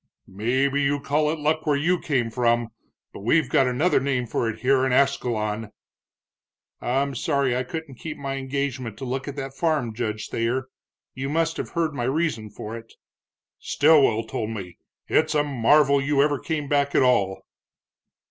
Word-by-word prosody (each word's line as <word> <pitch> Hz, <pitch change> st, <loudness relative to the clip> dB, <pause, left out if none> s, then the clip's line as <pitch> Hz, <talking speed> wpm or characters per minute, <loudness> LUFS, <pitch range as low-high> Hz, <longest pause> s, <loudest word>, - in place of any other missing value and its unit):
"Maybe 130 Hz, +8 st, 0 dB
you 145 Hz, +1 st, +1 dB
call 150 Hz, +2 st, +1 dB
it 160 Hz, -, -1 dB
luck 155 Hz, +1 st, -1 dB
where 150 Hz, -, +3 dB
you 175 Hz, +5 st, +1 dB
came 125 Hz, -6 st, -1 dB
from, 120 Hz, -1 st, +1 dB, 0.4 s
but -, -, -9 dB
we've 125 Hz, +7 st, +2 dB
got 135 Hz, 0 st, +3 dB
another 135 Hz, +9 st, +2 dB
name 130 Hz, -2 st, -1 dB
for 115 Hz, 0 st, -1 dB
it 115 Hz, -, -6 dB
here 130 Hz, 0 st, +3 dB
in 135 Hz, -, +1 dB
Ascalon." 115 Hz, -5 st, 0 dB, 1.1 s
"I'm 135 Hz, +3 st, 0 dB
sorry 140 Hz, -4 st, 0 dB
I 125 Hz, -, 0 dB
couldn't 140 Hz, 0 st, -7 dB
keep 160 Hz, -2 st, -6 dB
my 140 Hz, -1 st, -4 dB
engagement 130 Hz, -4 st, -3 dB
to 135 Hz, -, -6 dB
look 130 Hz, +2 st, -3 dB
at 140 Hz, -, -5 dB
that 135 Hz, -2 st, -5 dB
farm, 150 Hz, -7 st, 0 dB
Judge 110 Hz, -2 st, -3 dB
Thayer. 125 Hz, +3 st, -1 dB, 0.4 s
You 135 Hz, +1 st, -4 dB
must 165 Hz, +2 st, 0 dB
have -, -, -4 dB
heard 165 Hz, -3 st, 0 dB
my 120 Hz, -4 st, -2 dB
reason 130 Hz, -6 st, -1 dB
for 105 Hz, +2 st, -7 dB
it." 115 Hz, 0 st, -11 dB, 0.6 s
"Stilwell 140 Hz, -7 st, +4 dB
told 110 Hz, -1 st, -4 dB
me. 95 Hz, -6 st, -7 dB, 0.3 s
It's 155 Hz, 0 st, +2 dB
a 145 Hz, -, +3 dB
marvel 140 Hz, +1 st, +3 dB
you 140 Hz, +1 st, 0 dB
ever 145 Hz, -2 st, +1 dB
came 150 Hz, -3 st, -3 dB
back 140 Hz, 0 st, +1 dB
at -, -, +5 dB
all." 100 Hz, -7 st, +2 dB
135 Hz, 175 wpm, -24 LUFS, 120-145 Hz, 1.1 s, at